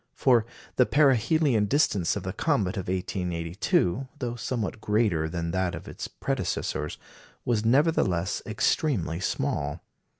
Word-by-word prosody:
For 120 -4 +3 0.3
the 125 - +5
perihelion 135 -3 +3
distance 105 - +2
of 100 - -4
the 95 -1 -4
comet 110 - 0
of 95 -3 -4
1882, 90 +4 -1
though 120 -4 -3
somewhat 115 -3 -3
greater 105 -8 +1
than 85 0 -3
that 95 0 0
of - - -9
its - - -6
predecessors, - - -3 0.5
was 115 -3 +1
nevertheless 115 - +2
extremely 110 - 0
small. 75 -4 -2
105 Hz, 125 wpm, -27 LUFS, 90-125 Hz, 0.5 s, the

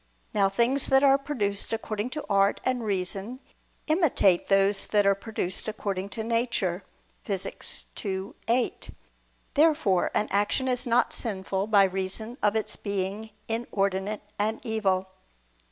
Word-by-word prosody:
Now 200 -2 +3
things 240 +7 +1
that 270 +1 +4
are 275 0 +6
produced 210 -9 -2
according 220 0 -2
to 300 - -4
art 200 -1 +3
and 255 -2 0
reason 200 +4 -2 0.5
imitate 305 - +3
those 195 0 +3
that 205 -1 +2
are 200 - +6
produced 200 -2 -3
according 200 -3 -3
to 220 - -2
nature 225 -6 0 0.4
(Phys. 195 -2 -3 0.2
ii, 190 -1 -3
8). 240 +2 0 0.6
Therefore 295 - +3
an 210 - +2
action 205 +6 +1
is 250 -1 -1
not 240 +1 +3
sinful 195 -3 -2
by 205 -2 +6
reason 195 +6 -3
of 210 +1 +2
its 220 - -1
being 200 +2 -3 0.2
inordinate 205 -3 -1 0.2
and 215 +2 0
evil. 195 -5 0
210 Hz, 135 wpm, -27 LUFS, 195-235 Hz, 0.6 s, are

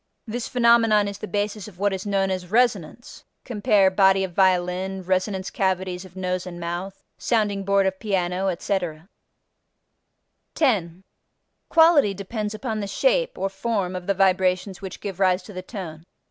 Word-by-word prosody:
This 235 +1 -4
phenomenon 230 -4 +4
is 200 0 -6
the 215 - -6
basis 205 0 -3
of 195 -4 -14
what 200 +1 +1
is 190 +1 -5
known 195 -1 +1
as 185 -1 -4
resonance 225 -2 0 0.2
(cf. 205 -5 +2
body 195 -1 +4
of 185 -2 -4
violin, 185 +1 +1
resonance 190 +1 -1
cavities 185 -1 -1
of 185 -1 -15
nose 185 -1 -3
and 175 -1 -8
mouth, 175 +3 -5 0.2
sounding 210 -4 0
board 200 0 +2
of 190 0 -1
piano, 190 -2 -1
etc.). 175 -2 -3 1.5
10. 190 - 0 0.7
Quality 320 - +5
depends 210 +2 -4
upon 220 -1 -3
the 200 - -3
shape - - +1
(or 195 - -1
form) 195 -2 -2
of 180 0 -6
the 200 - +1
vibrations 185 0 +1
which 190 -1 -8
give 195 -2 -6
rise 185 -1 +2
to 210 - -11
the 185 - -5
tone. 180 -6 -8
195 Hz, 160 wpm, -23 LUFS, 185-210 Hz, 1.5 s, Quality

